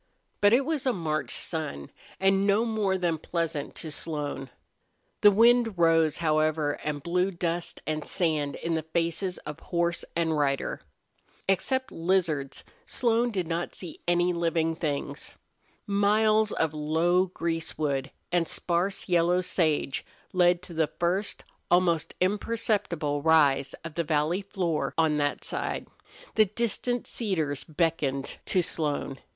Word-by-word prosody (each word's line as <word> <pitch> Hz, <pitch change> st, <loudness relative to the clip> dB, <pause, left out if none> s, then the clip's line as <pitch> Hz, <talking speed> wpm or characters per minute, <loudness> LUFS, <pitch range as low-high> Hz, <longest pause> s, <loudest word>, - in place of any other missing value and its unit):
But 205 Hz, 0 st, +6 dB
it 255 Hz, +4 st, +4 dB
was 305 Hz, -4 st, -1 dB
a 255 Hz, -, +3 dB
March 155 Hz, -5 st, -2 dB
sun, 150 Hz, -, -3 dB, 0.3 s
and 195 Hz, +1 st, +3 dB
no 205 Hz, +3 st, +3 dB
more 210 Hz, -4 st, 0 dB
than 170 Hz, -3 st, 0 dB
pleasant 165 Hz, -4 st, -3 dB
to 160 Hz, -, -6 dB
Slone. 145 Hz, -4 st, -3 dB, 0.7 s
The 205 Hz, -, +9 dB
wind 230 Hz, 0 st, +4 dB
rose, 165 Hz, -2 st, +4 dB
however, 155 Hz, -2 st, +1 dB
and 145 Hz, -2 st, -3 dB
blew 180 Hz, +2 st, +1 dB
dust 175 Hz, -1 st, -3 dB
and 155 Hz, -1 st, -2 dB
sand 155 Hz, -6 st, 0 dB
in 165 Hz, -, -3 dB
the 160 Hz, -, 0 dB
faces 170 Hz, +3 st, -1 dB
of 150 Hz, -1 st, -6 dB
horse 170 Hz, -1 st, -1 dB
and 165 Hz, -2 st, +1 dB
rider. 140 Hz, -2 st, 0 dB, 0.7 s
Except 260 Hz, +8 st, 0 dB
lizards 165 Hz, -6 st, 0 dB, 0.2 s
Slone 235 Hz, 0 st, +1 dB
did 190 Hz, -6 st, -2 dB
not 170 Hz, +1 st, -3 dB
see 175 Hz, -4 st, -8 dB
any 175 Hz, +1 st, +3 dB
living 165 Hz, -1 st, 0 dB
things. 145 Hz, -2 st, -3 dB, 0.5 s
Miles 215 Hz, +1 st, +3 dB
of 160 Hz, -1 st, 0 dB
low 165 Hz, +5 st, +2 dB
greasewood 155 Hz, -5 st, -2 dB, 0.2 s
and 175 Hz, -2 st, +2 dB
sparse 180 Hz, +3 st, -1 dB
yellow 175 Hz, 0 st, +3 dB
sage 155 Hz, -6 st, 0 dB, 0.3 s
led 175 Hz, -1 st, +3 dB
to 185 Hz, -, -9 dB
the 160 Hz, -1 st, +2 dB
first 180 Hz, +6 st, -1 dB, 0.3 s
almost 175 Hz, -3 st, +2 dB
imperceptible 200 Hz, -7 st, 0 dB
rise 145 Hz, -3 st, +4 dB
of 165 Hz, -1 st, -7 dB
the 170 Hz, -, -1 dB
valley 155 Hz, +4 st, +1 dB
floor 185 Hz, -5 st, -2 dB
on 160 Hz, -2 st, +3 dB
that 145 Hz, -1 st, -1 dB
side. -, -, -3 dB, 0.5 s
The 215 Hz, -, +5 dB
distant 235 Hz, +3 st, -1 dB
cedars 160 Hz, -, -2 dB
beckoned 150 Hz, -4 st, -1 dB
to 185 Hz, -, +2 dB
Slone. 145 Hz, -4 st, -2 dB
170 Hz, 135 wpm, -27 LUFS, 155-190 Hz, 0.7 s, The